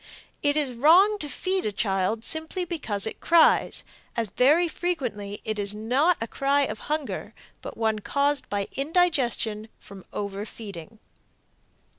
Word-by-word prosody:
It 290 0 +1
is 280 -4 0
wrong 355 - +5
to 295 - -5
feed 375 +5 -2
a 215 - -1
child 195 +2 -1
simply 320 +6 +2
because 235 - -1
it 220 - -5
cries, 335 -1 +3 0.3
as 230 -3 0
very 295 - +3
frequently 250 - -4
it 215 -1 -3
is 200 0 +1
not 260 +11 +2
a 225 - -3
cry 275 +4 +1
of 280 - -2
hunger, 305 -2 -3 0.3
but - - -8
one 220 -1 0
caused 280 +6 0
by 200 -1 -2
indigestion 270 -9 0
from 195 -2 -13
overfeeding. 200 -1 -7
250 Hz, 140 wpm, -25 LUFS, 210-315 Hz, 0.3 s, wrong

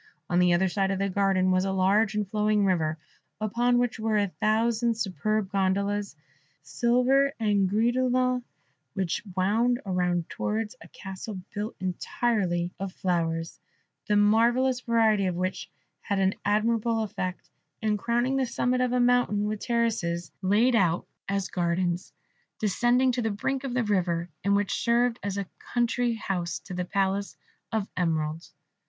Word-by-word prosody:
On 175 - +3
the 180 0 +4
other 190 +2 +3
side 195 +1 0
of 195 - 0
the 195 +1 0
garden 190 -1 +2
was 185 0 +2
a 195 - -1
large 195 +3 +2
and 210 -1 -1
flowing 210 0 +1
river, 160 -4 +1 0.4
upon 240 +3 +1
which 245 -2 0
were 220 -1 +1
a 205 -1 +1
thousand 225 +3 +1
superb 205 +1 -1
gondolas, 200 +1 0 0.5
silver 255 +3 +2
and 205 -3 +2
gris 225 +4 +2
de 255 +1 +1
lin, 255 0 +1 0.5
which 190 -4 -1 0.2
wound 230 +6 +2
round 180 -3 0
towards 220 +2 -3
a - - -12
castle 190 +1 -7
built 210 +2 -4
entirely 185 -1 -1
of 195 -1 -4
flowers, 165 -3 -2 0.5
the 210 - +2
marvellous 235 +5 +3
variety 220 -5 +2
of 180 - -1
which 185 +1 -3 0.3
had 200 - -2
an 190 0 +2
admirable 225 +2 +1
effect, 185 -3 -5 0.3
and 210 -1 +1
crowning 240 +5 0
the 265 - +2
summit 250 +2 0
of 250 -1 +1
a 250 - +2
mountain 245 -4 +2
with 210 0 -2
terraces 210 -9 -1
laid 215 +6 +3
out 175 -5 +2 0.2
as 200 -1 -1
gardens, 175 0 -1 0.5
descending 240 +5 +2
to 245 0 -1
the 225 - 0
brink 265 +6 -2
of 260 -3 -4
the 250 - +2
river, 175 -5 0
and 200 +1 +3
which 205 -1 0
served 235 0 +2
as 200 -1 -3
a 200 - -2 0.3
country 240 0 +1
house 180 -5 -3
to 190 - -10
the 180 0 -2
Palace 195 +1 -1 0.3
of 220 -3 -1
Emeralds. 160 -2 -2
205 Hz, 160 wpm, -27 LUFS, 185-235 Hz, 0.5 s, the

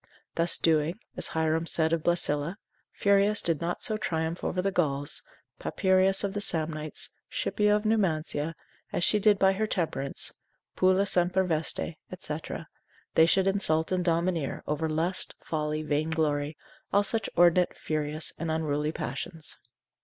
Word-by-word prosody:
Thus 170 +1 +2
doing, 160 +2 +2 0.2
as - - +5
Hierom 160 +1 0
said 160 0 +1
of 165 - +1
Blesilla, 165 0 0 0.3
Furius 200 +1 +3
did 165 -3 0
not 170 +1 -3
so 215 - 0
triumph 160 -4 -2
over 180 - -1
the 195 +2 +1
Gauls, 145 -5 -1 0.4
Papyrius 190 0 +3
of 200 -1 -1
the 205 - -3
Samnites, 155 -4 -1 0.2
Scipio 210 -1 +1
of 210 +1 -2
Numantia, 165 -7 0 0.4
as - - -1
she 210 +3 +3
did 210 0 +4
by 190 0 +4
her 215 +3 -1
temperance; 160 -8 0 0.4
pulla 185 +1 +3
semper 185 0 +3
veste, 160 -2 -1 0.3
&c., 150 -3 -4 0.8
they 160 - +6
should 190 +2 +3
insult 190 -5 +1
and 185 -1 +1
domineer 170 -3 0
over 150 +2 -1
lust, 165 +4 0
folly, 155 -1 -2
vainglory, 150 -1 -1 0.3
all 200 +1 +4
such 220 0 0
inordinate, 175 +1 +4
furious 155 0 -1
and 165 0 -3
unruly 155 -1 -1
passions. 155 +1 -5
165 Hz, 145 wpm, -28 LUFS, 155-190 Hz, 0.8 s, they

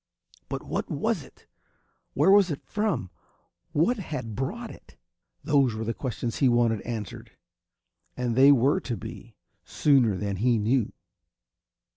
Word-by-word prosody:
But - - -4
what - - -3
was - - -1
it? - - -17 0.7
Where 155 +8 +4
was 200 -2 +6
it 145 - -4
from? 210 - -2 0.6
What 175 +12 +2
had 130 - -5
brought 220 - -4
it? - - -16 0.5
Those 140 -7 +2
were 110 - -3
the 115 +1 -2
questions 120 -3 -4
he 135 - +4
wanted 120 -3 +2
answered; 110 -6 -6 0.8
and 125 -2 -1
they 135 +3 +7
were 140 +6 +3
to 120 - -4
be, - - -10 0.3
sooner 130 -9 +2
than 100 0 -3
he 120 +3 +2
knew. 110 +2 +1
125 Hz, 140 wpm, -26 LUFS, 115-150 Hz, 0.8 s, they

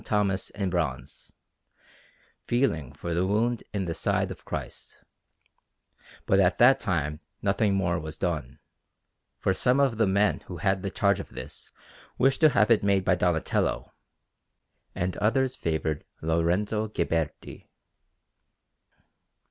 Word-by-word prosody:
Thomas 100 -3 0
in 100 -3 -3
bronze, 80 -8 -3 1.2
feeling 85 - 0
for 85 - -5
the 90 +3 +1
wound 115 +4 +1
in 100 -2 -2
the 85 - -2
side - - 0
of - - -10
Christ; - - -7 1.2
but 95 - +3
at 90 -2 +3
that 130 +3 +6
time 75 - -1 0.2
nothing 100 0 +2
more 90 -3 0
was 80 -1 -7
done, 80 -9 -3 0.8
for - - +1
some 125 +2 +2
of 135 -5 +2
the 110 - +4
men 100 +2 +2
who 90 - -7
had 95 +3 0
the - - -3
charge - - +1
of - - -7
this - - -9 0.5
wished 135 +3 +2
to 155 - +7
have 110 -4 +3
it 115 - +5
made 100 -2 +2
by - - +4
Donatello, 90 -3 0 1.0
and 90 +1 -2
others 130 +5 +1
favoured 80 - -2 0.2
Lorenzo 90 +7 0
Ghiberti. 80 -6 -3
95 Hz, 130 wpm, -27 LUFS, 85-110 Hz, 1.2 s, to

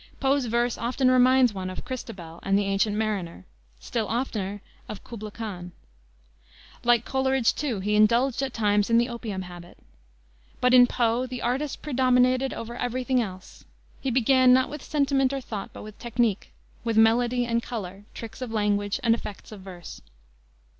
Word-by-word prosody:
Poe's 270 -1 +1
verse 235 +1 0
often 255 +2 +1
reminds 255 -1 +5
one 185 -1 -4
of 185 - -7
Christabel 195 -11 -7
and 195 0 +1
the 205 - +2
Ancient 195 +2 +1
Mariner, 200 - -3 0.3
still 225 - -3
oftener 210 -4 -2 0.3
of 210 - -7
Kubla 215 -2 -8
Khan. 190 -5 -7 1.1
Like 240 -1 +3
Coleridge, 265 -2 +1
too, 250 -10 -3
he 210 +2 -1
indulged 235 +5 +3
at 270 -1 -2
times 210 -2 +1
in 230 - +4
the 240 +1 +3
opium 225 -6 -5
habit. 175 -1 -11 0.8
But 250 0 +3
in 245 -1 +8
Poe 240 +1 0
the 250 -1 -6
artist 260 +5 -2
predominated 255 -1 +2
over 235 +1 -6
every 245 +1 -2
thing 255 -1 +2
else. 185 -4 -8 0.4
He 270 - -1
began 255 +1 +4
not 260 +1 +4
with 300 -1 -7
sentiment 275 -3 +1
or 275 - -1
thought, 215 -6 -6
but - - -10
with 215 -1 -11
technique, 235 -4 -1 0.3
with 230 -2 -1
melody 240 +2 +3
and 235 0 0
color, 200 -4 -7
tricks 230 +3 -8
of 250 -3 -4
language, 205 0 0
and 230 -1 +4
effects 210 -3 -6
of 210 -3 -10
verse. 180 -3 -10
235 Hz, 165 wpm, -26 LUFS, 205-255 Hz, 1.1 s, in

